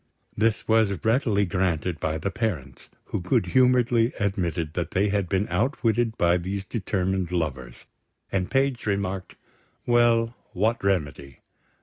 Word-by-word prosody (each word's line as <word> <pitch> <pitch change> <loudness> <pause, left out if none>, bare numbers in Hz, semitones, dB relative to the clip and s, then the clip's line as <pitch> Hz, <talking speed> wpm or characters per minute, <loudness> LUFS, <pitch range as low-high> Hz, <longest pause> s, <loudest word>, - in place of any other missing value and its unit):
This 110 +1 0
was 110 -3 +3
readily 110 -3 +2
granted 90 -2 -1
by 80 -2 -1
the 100 +5 -3
parents, 85 - -4 0.2
who - - -4
good 90 0 +1
humouredly 125 +2 +3
admitted 85 -6 -1
that 85 -2 -2
they 100 +4 +1
had 100 -3 -1
been 100 +2 0
outwitted 115 -3 0
by 85 0 +3
these 95 +2 -4
determined 95 -4 -2
lovers; 65 -8 -4 0.5
and 95 -2 -1
Page 135 -4 0
remarked: 95 -2 -2 0.5
Well, 120 -1 +3 0.2
what 110 +4 0
remedy? 75 -8 -2
100 Hz, 130 wpm, -25 LUFS, 90-115 Hz, 0.5 s, was